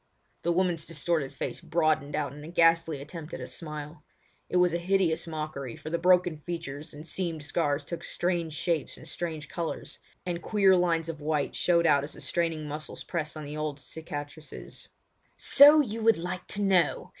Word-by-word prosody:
The 170 - +1
woman's 175 -2 +1
distorted 160 -3 -1
face - - -4
broadened 155 -3 +1
out 140 -2 -1
in 150 +1 -10
a - - -8
ghastly 165 -3 +3
attempt 155 +1 -7
at - - -7
a - - -5
smile. 150 -1 -7 0.5
It - - +1
was 180 -1 +4
a 170 - 0
hideous 175 -2 +1
mockery, 155 -6 -4
for 155 - -8
the 170 - 0
broken 180 -2 +4
features 155 -2 -6
and 150 +2 -10
seamed 165 -3 -3
scars 145 -2 0
took 170 - -6
strange 175 -3 -1
shapes 160 -1 -1
and - - -12
strange 160 -3 -4
colours, 170 +2 -5 0.3
and 175 -1 -2
queer 195 -3 +4
lines 170 -2 +2
of 160 -2 -5
white 150 -1 -1
showed 170 -1 +3
out 140 -4 +5
as 145 - -7
the - - -11
straining 165 -3 -1
muscles 150 +1 -6
pressed 160 -2 -4
on 155 - -6
the 150 +1 -6
old 155 -2 -2
cicatrices. 145 +2 -8 0.5
"So 295 +2 +8
you 225 -4 -3
would 225 0 +5
like 175 +2 -5
to 205 - -1
know! 185 -5 +2
165 Hz, 185 wpm, -28 LUFS, 150-175 Hz, 0.5 s, So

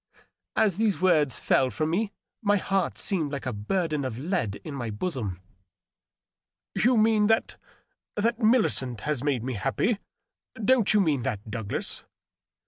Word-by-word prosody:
As 200 -5 +2
these 215 -3 +1
words 155 -9 +3
fell 130 - +3
firom 155 +8 -1
me 200 +5 0 0.3
my 205 -2 +3
heart 195 0 -1
seemed 160 -7 0
like 140 -2 -4
a 125 - -2
burden 150 - -1
of 125 -4 -4
lead 145 - -1
in 155 - -6
my 120 -5 -4
bosom. 105 - -3 0.7
" - - -67
You 245 +1 +4
mean 215 -1 +4
that 225 +1 +1 0.3
— - - -51
^that 230 +2 +1
Millicent 215 - +2
has 150 -2 -2
made 135 -6 0
me 130 +1 -2
happy? 135 - 0 0.6
Don't 225 0 +3
you 210 - +6
mean 150 -8 +1
that, 105 -1 -4
Douglas 110 -2 -3
155 Hz, 155 wpm, -27 LUFS, 125-210 Hz, 0.7 s, you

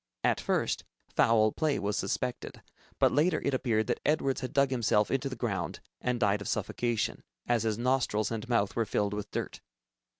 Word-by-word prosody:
At - - +2
first, - - 0 0.3
foul 110 -1 +4
play 155 +2 0
was 100 0 -1
suspected, 125 -1 -3 0.3
but - - +4
later 155 +3 +3
it 140 - +1
appeared 115 -4 +1
that 120 - -1
Edwards 145 -3 +1
had 130 - -4
dug 140 -1 +3
himself 110 -4 +2
into 135 0 0
the 130 - -5
ground 100 -9 -3 0.2
and 125 -1 0
died 105 -2 +2
of 100 - -5
suffocation, 120 -2 -1 0.3
as 120 -2 +2
his 110 -1 0
nostrils 120 -4 +1
and 115 +2 -4
mouth 105 -5 +1
were 115 -2 0
filled 105 0 0
with 105 0 -4
dirt. - - -4
120 Hz, 180 wpm, -30 LUFS, 105-130 Hz, 0.3 s, foul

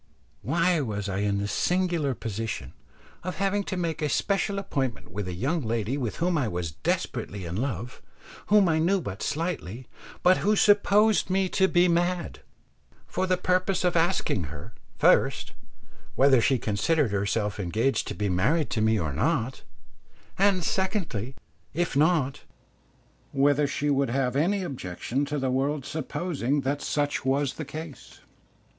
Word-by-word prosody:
Why 170 0 +2
was 105 -6 -3
I 95 -1 -2
in 100 -1 0
the 100 0 -1
singular 175 - 0
position 115 0 -5 0.5
of 185 +1 -4
having 200 +1 0
to 190 - -3
make 165 -2 -2
a 150 - 0
special 200 +4 0
appointment 135 - -3
with 100 -1 -4
a 90 - -4
young 140 - -1
lady 115 +1 -1
with 125 -6 -3
whom 170 -1 +1
I 130 - 0
was 90 -5 -3
desperately 90 +4 -3
in 85 +1 -4
love, 120 0 -4 0.5
whom 205 -1 +5
I 160 -1 +2
knew 185 +5 +2
but 100 - -6
slightly, 140 - -3 0.4
but 185 +1 +6
who 210 +1 +2
supposed 205 +1 +4
me 190 0 +1
to 190 +1 +3
be 180 -1 +4
mad, 175 +1 0 0.7
for 185 - -2
the 185 0 +2
purpose 185 +1 +1
of 180 -1 +1
asking 165 - +1
her, 80 +9 -9 0.2
first, - - +3 0.6
whether 135 -2 +5
she 130 +3 +3
considered 115 +5 +1
herself 100 +1 -1
engaged 110 +8 0
to - - -4
be 105 - -1
married 120 - +1
to 110 - 0
me 110 0 +3
or 80 -5 -2
not; 130 - 0 0.7
and 195 -2 +3
secondly, 170 - -2 0.4
if 175 -2 -1
not, 150 -3 +2 0.9
whether 145 +1 +3
she 145 +1 -1
would 140 -1 +1
have 130 0 0
any 185 +7 +1
objection 130 - -3
to 145 +1 -3
the 130 -2 0
world 135 +2 0
supposing 150 -3 -2
that 140 +2 -2
such 145 -1 -1
was 135 +1 +1
the 155 - -6
case? 155 0 -9
140 Hz, 155 wpm, -26 LUFS, 115-175 Hz, 0.9 s, but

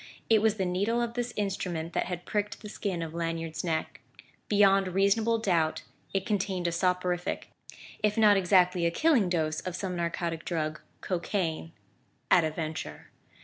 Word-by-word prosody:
It 220 -2 +6
was 220 -1 +3
the 195 -3 -1
needle 200 +6 0
of 235 -1 -1
this 245 0 -2
instrument 180 -5 -3
that - - 0
had 180 -1 -5
pricked 210 0 -2
the 210 - -7
skin 190 -5 -3
of 160 -1 -6
Lanyard's 165 -1 -3
neck; 160 -3 -2 0.5
beyond 195 -2 +5
reasonable 200 +5 +2
doubt 170 -7 +1 0.3
it 195 -1 -1
contained 190 -3 -1
a 170 - +2
soporific, 180 0 -1 0.5
if 210 +1 +1
not 210 -2 +6
exactly 180 -2 +3
a - - +3
killing 245 - +3
dose 155 -3 0
of 180 -2 -5
some 185 -1 -3
narcotic 170 -1 -2
drug 155 -3 -2 0.2
cocaine, 170 -3 -2 0.6
at 175 - +6
a 160 - +1
venture. 155 0 -6
180 Hz, 160 wpm, -29 LUFS, 170-205 Hz, 0.6 s, It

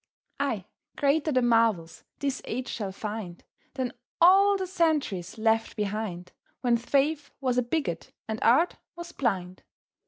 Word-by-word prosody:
Ay, - - -1 0.3
greater 290 +2 +2
the 255 -2 +2
marvels 225 -8 +2
this 275 -2 -2
age 255 +3 -3
shall 200 -4 -4
find 205 -3 -6 0.3
Than 260 -2 -2 0.3
all 390 +3 +6
the 380 - -2
centuries 305 - 0
left 225 0 +1
behind, 200 -4 -3 0.3
When 245 -2 +3
faith 285 +5 +1
was 255 -2 +1
a - - +3
bigot 235 - -2 0.2
and 220 0 -3
art 270 +10 +4 0.2
was 345 0 -8
blind. 185 - -2
240 Hz, 135 wpm, -27 LUFS, 210-290 Hz, 0.3 s, all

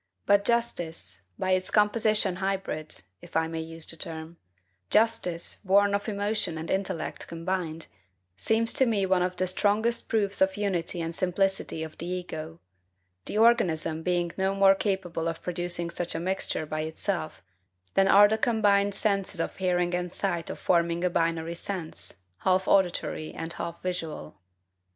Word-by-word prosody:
But 200 0 +4
justice, 175 - -1
by 185 - -1
its 185 0 +2
composition 210 -2 +2
hybrid 190 - -3 0.2
if - - -14
I 160 0 +2
may 165 0 -4
use 165 0 -4
the - - -3
term, 165 0 -3 0.5
justice, 215 -6 +2
born 200 +1 +4
of 200 +2 -1
emotion 205 -4 -1
and 160 +1 -5
intellect 190 -3 -2
combined, 165 -1 -3 0.5
seems 225 - +1
to 265 - +3
me 205 -4 +1
one 185 -1 +2
of 180 0 -1
the 185 - +2
strongest 210 +5 +1
proofs 200 -3 +1
of 190 0 +4
the 205 - -5
unity 180 -3 -1
and 165 0 -3
simplicity 185 -2 0
of 160 -1 -9
the 170 - -5
ego; 165 -3 -5 0.7
the - - -4
organism 175 -9 +3
being 175 0 0
no 190 0 +1
more 195 0 +6
capable 190 -4 -2
of 165 -1 -4
producing 175 -1 -2
such 170 -1 -2
a - - -1
mixture 180 -3 -1
by 155 0 -3
itself, 160 - -3 0.5
than 195 0 +4
are 205 +1 +8
the 220 +1 0
combined 205 -3 +3
senses 200 -3 0
of - - -2
hearing 180 -1 +1
and 180 0 -2
sight 175 -4 -2
of - - -5
forming 170 -1 +1
a 180 - +2
binary 165 0 0
sense, 170 - -6 0.2
half 185 0 +2
auditory 175 -4 +1
and 165 +1 -4
half 170 0 -5
visual. 165 - -5
180 Hz, 160 wpm, -27 LUFS, 165-200 Hz, 0.7 s, are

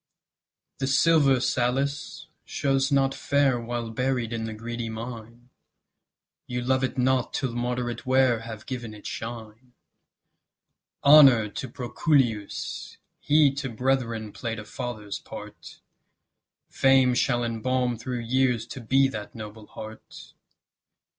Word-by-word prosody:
The 135 - -1
silver, 140 -1 +4
Sallust, 135 +4 -1 0.2
shows 135 0 0
not 135 -1 +3
fair 140 -4 +1
While 120 -1 -4
buried 125 -1 -1
in 110 -1 -3
the 110 - -5
greedy 115 +1 -5
mine: 115 +1 -8 1.0
You 125 0 -3
love 130 +1 +1
it 130 - -2
not 130 0 +1
till 130 -4 -1
moderate 120 -1 -2
wear 130 -2 +3
Have 110 -1 -9
given 120 -4 -6
it 105 - -14
shine. 115 +1 -7 1.3
Honour 135 -7 +8
to 130 +5 -6
Proculeius! 120 -3 -1 0.2
he 145 -2 +4
To 135 -1 -4
brethren 115 -3 -1
play'd 115 +1 -4
a 105 - -7
father's 105 -3 -5
part; - - -11 0.9
Fame 135 -1 +4
shall 120 -1 +1
embalm 120 +2 0
through 120 +1 -4
years 125 -1 +1
to 130 - -7
be 135 +4 +3
That 105 -5 -7
noble 110 -1 -9
heart. 110 0 -11
120 Hz, 120 wpm, -26 LUFS, 115-135 Hz, 1.3 s, Honour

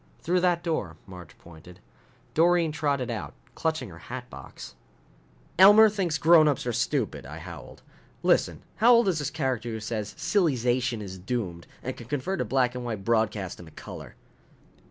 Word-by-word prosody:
"Through 180 +2 +2
that 175 -1 +1
door." 165 -2 -2
Marge 90 -5 -12
pointed. 85 +2 -15 0.5
Doreen 170 0 +3
trotted 140 -5 -1
out, - - -6 0.2
clutching 160 -7 -2
her 85 -1 -12
hat 125 0 -6
box. 65 - -10 0.9
"Elmer 205 +3 +9
thinks 185 -6 -1
grownups 155 -3 +4
are 120 - -1
stupid?" - - -1
I - - -9
howled. - - -11 0.4
"Listen, - - +2
how 235 +3 +6
old 235 -2 +4
is 175 -5 +1
this 145 - -2
character 130 -6 -2
who 110 -1 -4
says 110 -1 -4
silly 175 -9 +1
zation 120 -2 0
is 95 -2 -8
doomed 90 -4 -4 0.2
and 130 - -4
can 115 - -11
convert 150 +8 -2
a - - -1
black 130 -2 +1
and 125 0 -5
white 110 -5 -5
broadcast 110 -5 0
into 85 -3 -13
color?" - - -10
125 Hz, 165 wpm, -26 LUFS, 110-165 Hz, 0.9 s, Elmer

